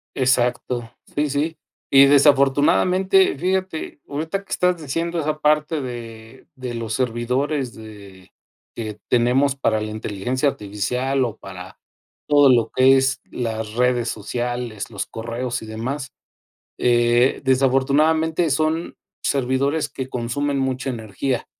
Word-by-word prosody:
Exacto. 125 -2 0 0.3
Sí, 150 0 +1
sí, 150 +3 -1 0.3
y 135 0 +8
desafortunadamente, 145 +7 +4
fíjate 185 -3 -2
ahorita 160 +7 -3
que - - -21
estás 180 -2 +1
diciendo 165 +4 -2
esa 155 0 -2
parte 150 +1 +1
de 115 -1 -9
de 130 -2 -6
los 115 -1 -4
servidores 125 +2 -1
de 100 -4 -13 0.4
que 110 -2 -6
tenemos 125 +3 +2
para 110 -5 0
la 110 0 -4
inteligencia 110 +6 -1
artificial 125 +5 -2
o 115 -2 -5
para 95 -1 -10 0.5
todo 145 -2 +6
lo 120 -3 +3
que 130 +1 +6
es 135 0 +1
las 110 -3 -4
redes 125 -1 +1
sociales, 120 0 -4
los 105 -3 -4
correos 120 +2 -4
y - - -8
demás. 130 +6 -5 0.7
Eh, 120 +1 +3
desafortunadamente, 145 +6 +2
son 155 +4 -1 0.3
servidores 140 +3 0
que 130 -1 -6
consumen 135 +3 -2
mucha 135 0 -1
energía. 115 +2 -3
130 Hz, 120 wpm, -21 LUFS, 115-145 Hz, 0.7 s, y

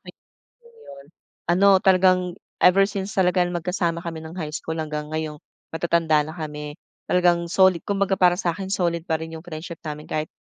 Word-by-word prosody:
may - - -13 0.5
'yon 470 -1 -22
'yon, 140 0 -12 0.5
ano 195 +1 +6
talagang, 185 -1 +3 0.2
ever 190 +2 +6
since 200 0 -3
talaga 180 -1 +3
na 175 - -5
magkasama 170 0 -2
kami 165 -1 -5
ng 160 +1 -10
high 155 -4 -4
school 160 +1 -4
hanggang 150 -1 -4
ngayong 155 -1 -4 0.3
matatanda 165 -1 +2
na 155 - -8
kami. 150 -2 -6 0.3
Talagang 175 -1 +2
soli 190 0 +4
kumbaga 195 +1 -1
para 180 -1 +5
sa'kin 185 0 -2
solid 170 -3 -1
pa 160 - +1
rin 160 - -8
'yong 160 - -18
friendship 165 0 -8
namin 150 0 -6
kahit 155 0 -2
170 Hz, 180 wpm, -23 LUFS, 160-185 Hz, 0.5 s, ano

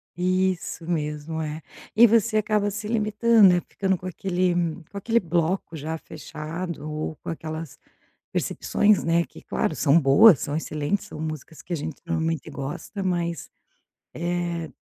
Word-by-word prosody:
Isso 185 -1 0
mesmo, 150 -1 -2
é. 155 0 -4 0.3
E 235 +2 +8
você 225 0 +3
acaba 210 -1 +1
se 210 +1 -5
limitando, 215 -1 +4
né, 175 -1 +3
ficando 190 -2 0
com 180 - -12
aquele 185 0 0 0.4
com 200 - -7
aquele 230 +4 +2
bloco 170 0 -1
já 160 +2 -4
fechado 155 +1 -6
ou 155 +1 -4
com - - -8
aquelas 160 -2 -6 0.5
percepções, 210 0 +2
né, 165 +1 +3
que - - -14
claro 155 - -1
são 150 +2 +4
boas, 145 - +7
são 145 - -2
excelentes, 155 +4 -2
são - - -9
músicas 155 0 -6
que 180 - -5
a - - +2
gente 150 -1 -5
normalmente 165 -2 -1
gosta, 145 +9 -5
mas, 175 -2 -2 0.6
eh, 170 -1 -2
170 Hz, 150 wpm, -25 LUFS, 155-190 Hz, 0.6 s, E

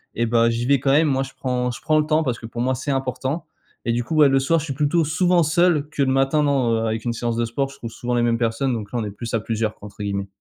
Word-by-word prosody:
et 120 - +1
bah, 115 0 +3
j'y 115 +1 -1
vais 140 +1 +3
quand 135 +2 +1
même. 155 +3 +4
Moi 135 -2 +1
je 135 - -9
prends 125 -1 -1
je - - -9
prends 155 0 +2
le 150 - +1
temps, 155 +1 +2
parce 125 -5 -2
que - - -9
pour 120 +1 -5
moi 130 +1 +1
c'est 140 +4 -3
important. 135 +4 -2 0.4
Et 115 - +1
du 120 +1 0
coup, 160 - -4
ouais, 150 -2 +7
le 135 0 +3
soir 165 +5 +2
je 155 - -5
suis 140 - -3
plutôt 150 +4 +1
souvent 175 +3 +2
seul, 160 -1 +2
que 150 - -3
le 130 - +1
matin 135 +3 +2
non, 125 -6 +1
avec 110 +1 -2
une 120 - 0
séance 115 0 -2
de 120 - +1
sport 135 +4 -2
je 135 - -13
trouve 115 -3 -7
souvent 120 +1 -3
les 120 - +2
mêmes 115 -1 +2
personnes 120 +3 0
donc 105 -3 -5
là 120 - -2
on 110 - -2
est 105 - -5
plus 115 +3 -7
«à 115 - +2
plusieurs» 110 0 -2
entre 105 0 -11
guillemets. 100 -1 -2
130 Hz, 310 wpm, -22 LUFS, 115-145 Hz, 0.4 s, ouais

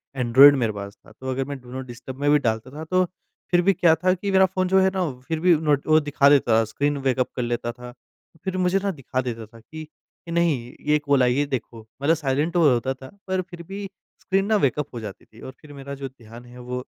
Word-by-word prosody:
Android 135 +3 +7
मेरे 115 -4 0
पास 100 0 -7
था - - -16
तो 130 0 -8
अगर 135 +1 -2
मैं 140 -1 -6
डू 125 0 -14
नॉट 130 0 -6
डिस्टर्ब 125 +2 -9
में 145 - +2
भी 150 - +5
डालता 115 0 -2
था 155 +2 -7
तो 185 +2 +2 0.5
फिर 175 0 +4
भी 195 +2 +3
क्या 165 -1 +4
था 185 0 +4
कि 195 +2 -3
मेरा 190 0 +5
फ़ोन 185 0 -1
जो 190 +1 +4
है 190 0 +4
ना 190 - -1
वो 130 -6 -4
फिर 160 -1 -2
भी 175 -1 +5
नोट 145 -2 +1
वो 155 0 +5
दिखा 145 -1 +3
देता 140 -5 +3
था - - +3
स्क्रीन 145 +6 -1
वेकअप 130 0 +1
कर 125 - -2
लेता 120 0 -2
था 125 0 -11 0.5
फिर 190 -1 -3
मुझे 185 +1 +2
ना 200 - 0
दिखा 130 -4 -3
देता 115 -3 -5
था 115 +1 -17
कि 155 +6 -10 0.4
नहीं 160 -8 0
ये 150 0 +4
कॉल 140 -3 +2
आई 125 0 +3
है 140 - 0
ये 145 - +2
देखो। 125 -4 -5 0.2
मतलब 160 +4 +3
साइलेंट 150 +3 -1
वो 165 -4 +5
होता 125 +3 -1
था 130 0 -12 0.2
पर 185 0 0
फिर 175 -1 -11
भी 195 +3 -7 0.4
स्क्रीन 195 0 0
ना 215 +1 +2
वेकअप 145 +3 -1
हो 120 - -5
जाती 105 -3 -9
थी 110 - -18
और 130 - -8
फिर 145 -1 -13
मेरा 140 0 -8
जो 135 0 -6
ध्यान 120 -1 -14
है 125 +1 -13
वो 125 +1 -5
140 Hz, 260 wpm, -23 LUFS, 125-170 Hz, 0.5 s, Android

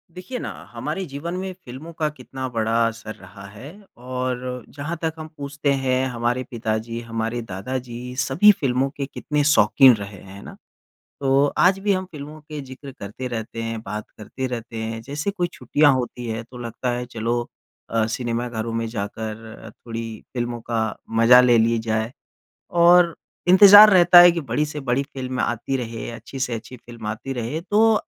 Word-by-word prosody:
देखिए 215 +8 -6
ना, - - -5 0.2
हमारे 195 - -4
जीवन 150 +3 -6
में 190 0 -4
फ़िल्मों 155 -2 -11
का 155 -1 -1
कितना 130 -2 -7
बड़ा 115 -2 -1 0.2
असर 110 -1 -7
रहा 100 +1 -13
है। 120 +8 -10 0.3
और 125 0 -4
जहाँ 155 +4 -4
तक 160 -1 -1
हम 155 - -6
पूछते 145 0 -2
हैं, 130 -1 0
हमारे 120 +1 -1
पिता 110 -2 -1
जी, 115 +1 -5
हमारे 115 +1 -3
दादा 110 +4 -4
जी, 125 0 -7
सभी 175 +10 +5
फ़िल्मों 135 0 +1
के 140 - -2
कितने 150 +2 -2
शौक़ीन 130 -2 +6
रहे, 100 -1 -8
हैं 100 +1 -12
ना। - - -10 0.7
तो 135 +1 +3
आज 185 +2 +4
भी 200 +1 +1
हम 185 0 -2
फ़िल्मों 150 0 -9
के 150 0 -7
ज़िक्र 135 +1 -10
करते 105 +6 -6
रहते 115 -1 -5
हैं, 115 -1 -4
बात 105 0 -6
करते 130 +5 -5
रहते 115 -2 -6
हैं, 115 0 -4
जैसे 145 - -3
कोई 180 -3 -1
छुट्टियाँ 145 +4 +3
होती 125 -1 -3
हैं, 110 0 -3
तो 125 - -10
लगता 120 +1 -3
है 120 0 -3
चलो 120 +1 -2 0.4
अ, 115 -1 +1
सिनेमाघरों 115 -1 -3
में 115 0 -1
जाकर 110 +1 -6
थोड़ी 115 +1 -7 0.3
फ़िल्मों 120 -1 -3
का 115 -1 0 0.4
मज़ा 120 +2 +8
ले 120 -2 +5
लिए 115 +1 +3
जाए। 110 0 -1 0.7
और 175 -1 +6 0.3
इंतज़ार 205 +3 +10
रहता 175 -2 +8
है 175 0 +9
कि 170 - -2
बड़ी 140 +1 -1
से 150 0 -6
बड़ी 135 0 0
फ़िल्म 130 -2 -5
आती 120 +3 -1
रहे, 115 -3 -5
अच्छी 120 +3 -9
से 125 -2 -1
अच्छी 115 +3 -8
फ़िल्म 120 -2 -11
आती 110 +5 -4
रहे। 125 +5 -3
तो 220 +2 +5
125 Hz, 180 wpm, -22 LUFS, 115-145 Hz, 0.7 s, इंतज़ार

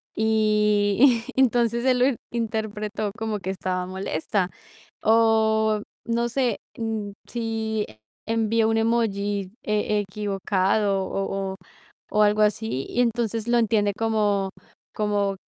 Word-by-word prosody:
Y 215 +2 +3
y 265 - +3
entonces 235 -1 +2
él 255 -1 +3
lo 250 - +5 0.3
interpretó 215 -2 -2
como 220 -2 -2
que 190 - -5
estaba 185 -1 -2
molesta. 185 0 -2 0.6
O, 220 -1 +3 0.3
no 235 +1 0
sé, 245 -2 0 0.2
mm, 220 -3 -3 0.2
si 225 -2 -2 0.4
envío 225 0 +2
un 225 - +2
emoji 205 -4 0
e 210 0 +1
equivocado 195 0 0
o 195 0 -2
o - - -11 0.6
o 210 - +3
algo 210 +1 +3
así 210 - 0
y 245 - +1
entonces 230 -1 -1
lo 240 0 +3
entiende 210 -3 +2
como 210 -3 +1 0.4
como 205 -2 0
215 Hz, 120 wpm, -24 LUFS, 205-225 Hz, 0.6 s, lo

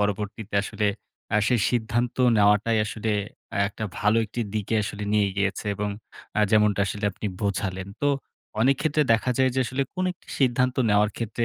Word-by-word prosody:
পরবর্তীতে 105 +1 -2
আসলে 105 +1 -1 0.5
আ - - +5
সেই 120 -4 +2
সিদ্ধান্ত 120 0 0 0.2
নেওয়াটাই 105 +2 +4
আসলে 110 0 -3 0.6
একটা 110 +2 -6
ভালো 105 +2 +3
একটি 115 +3 -5
দিকে 105 +1 -1
আসলে 105 0 -4
নিয়ে 105 -2 +3
গিয়েছে। 100 -1 -1
এবং 105 +1 -2 0.5
আ - - +4
যেমনটা 105 -2 +4
আসলে 105 +1 -4
আপনি 105 - -5 0.2
বোঝালেন। 95 -1 -2
তো 145 - +2 0.5
অনেকক্ষেত্রে 145 +4 +3
দেখা 115 +3 +1
যায় 130 0 +4
যে - - 0
আসলে 130 +3 -1
কোন 185 0 -1
একটি - - -28
সিদ্ধান্ত 125 0 +2
নেওয়ার 105 +1 +4
ক্ষেত্রে 115 +1 -2
110 Hz, 165 wpm, -25 LUFS, 105-120 Hz, 0.6 s, আ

